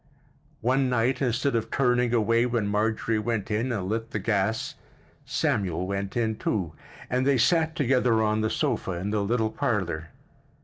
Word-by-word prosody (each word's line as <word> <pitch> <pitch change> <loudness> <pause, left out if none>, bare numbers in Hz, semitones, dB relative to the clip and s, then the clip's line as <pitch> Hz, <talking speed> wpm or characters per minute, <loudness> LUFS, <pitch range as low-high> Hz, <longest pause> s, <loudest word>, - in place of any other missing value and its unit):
One 130 +2 +2
night, 125 +2 +1
instead 125 +1 +1
of 115 - -1
turning 125 -2 +2
away 115 +1 +3
when 115 -3 0
Marjorie 110 +2 0
went 110 -2 -2
in 115 +5 0
and 100 -6 -2
lit 115 +2 -2
the - - -3
gas, 105 +1 0 0.5
Samuel 90 -3 0
went 100 +2 -3
in, 110 -2 0
too, 90 -7 -2 0.3
and 125 +1 0
they 140 0 +3
sat 160 +6 +2
together 125 -6 +2
on 110 0 +1
the 110 - +1
sofa 95 - -1
in 90 +4 -3
the 105 -1 +1
little 110 +1 0
parlor. 85 -10 -2
110 Hz, 165 wpm, -26 LUFS, 105-125 Hz, 0.5 s, away